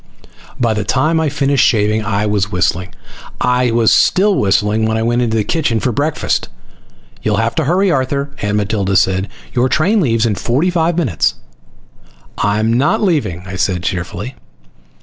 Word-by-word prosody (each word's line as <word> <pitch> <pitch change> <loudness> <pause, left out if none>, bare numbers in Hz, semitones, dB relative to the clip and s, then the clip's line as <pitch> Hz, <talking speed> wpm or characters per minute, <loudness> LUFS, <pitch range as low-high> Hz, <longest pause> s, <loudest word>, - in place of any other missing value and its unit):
By 115 -2 +1
the 105 0 -2
time 155 +10 +1
I 160 -2 +1
finished 140 -1 +1
shaving 105 0 +2
I 105 0 -1
was 105 -1 0
whistling. 90 0 -1 0.4
I 125 0 +2
was 115 -1 +3
still 205 +2 +3
whistling 105 - +1
when 110 0 0
I 110 - -1
went 120 +1 +1
into 115 -2 0
the 110 - +1
kitchen 120 -4 0
for 125 - -1
breakfast. 145 +6 -1 0.7
"You'll - - 0
have 115 +1 0
to 160 - -1
hurry, 185 +5 +2
Arthur," 140 0 -1
Aunt 105 0 0
Matilda 100 -1 -1
said. 95 +1 +2 0.3
"Your 125 +1 +1
train 195 +10 +2
leaves 115 -6 +1
in 110 - +1
forty 135 - 0
five 170 -1 0
minutes." 95 - 0 1.0
"I'm 110 +2 +1
not 155 - +1
leaving," 115 - 0
I 95 0 -7
said 90 -1 -1
cheerfully. 90 +7 -4
115 Hz, 170 wpm, -16 LUFS, 105-145 Hz, 1.0 s, was